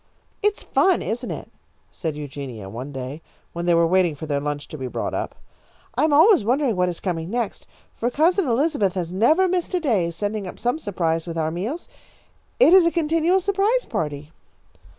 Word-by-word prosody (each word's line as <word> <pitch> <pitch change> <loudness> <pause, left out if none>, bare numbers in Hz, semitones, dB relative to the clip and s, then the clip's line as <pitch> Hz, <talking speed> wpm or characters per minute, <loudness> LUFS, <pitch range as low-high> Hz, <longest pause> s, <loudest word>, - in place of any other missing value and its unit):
"It's 415 0 0
fun, 375 -2 +2
isn't 240 +2 -3
it?" - - -6 0.4
said 160 -4 -4
Eugenia, 135 -8 -7
one 125 +7 -7
day 135 +3 -6 0.3
when 170 +1 -4
they 170 - +5
were 170 0 +4
waiting 175 -2 +2
for 150 - -7
their 145 -2 -1
lunch 145 0 -4
to 155 - -7
be 130 - -3
brought - - -3
up. - - -3 0.6
"I - - +1
am 315 - +1
always 325 - +6
wondering 250 +1 +1
what 180 0 +1
is 175 - -5
coming 165 -3 -3
next, 235 -1 -3 0.3
for 240 - 0
Cousin 335 +6 +2
Elizabeth 240 - +1
has 175 -2 -3
never 310 - +4
missed 365 0 -1
a - - +2
day, 220 - +1
sending 205 +4 -3
up - - -8
some 245 +6 -1
surprise 165 - -1
with 165 -1 -5
our 160 -1 0
meals. 220 - -4 0.7
It 420 -8 +7
is 370 -3 +7
a - - +2
continual 330 +2 +2
surprise 400 +6 +1
party." 150 -1 -4
200 Hz, 190 wpm, -23 LUFS, -, 0.7 s, It